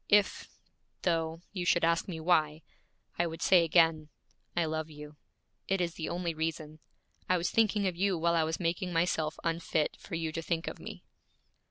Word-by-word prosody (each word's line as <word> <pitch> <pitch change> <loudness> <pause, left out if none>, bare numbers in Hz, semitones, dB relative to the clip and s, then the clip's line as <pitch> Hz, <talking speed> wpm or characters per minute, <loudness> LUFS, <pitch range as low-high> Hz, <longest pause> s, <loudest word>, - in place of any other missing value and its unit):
If, 205 -1 +3 0.6
though, 165 -1 0
you 185 -3 -3
should 175 -1 +3
ask 165 0 +1
me 170 -4 -5
why, 155 -2 +2 0.6
I 175 - +3
would 165 0 -5
say 180 -3 +6
again, 165 -2 +3 0.5
I 170 - +3
love 160 0 -3
you. 150 0 -11 0.5
It 195 0 +1
is 170 -2 -1
the 160 - -4
only 175 -1 -2
reason. 155 -1 -4 0.5
I 185 - +4
was 175 +1 -1
thinking 215 -2 +2
of 185 -2 0
you 190 0 +1
while 170 +1 +2
I 165 -1 +3
was 160 +1 -2
making 175 +1 -1
myself 165 -2 0
unfit 165 -2 0
for 180 - -7
you 165 -1 -2
to 165 - -4
think 165 0 -2
of - - -5
me.' - - -9
165 Hz, 185 wpm, -31 LUFS, 160-175 Hz, 0.6 s, say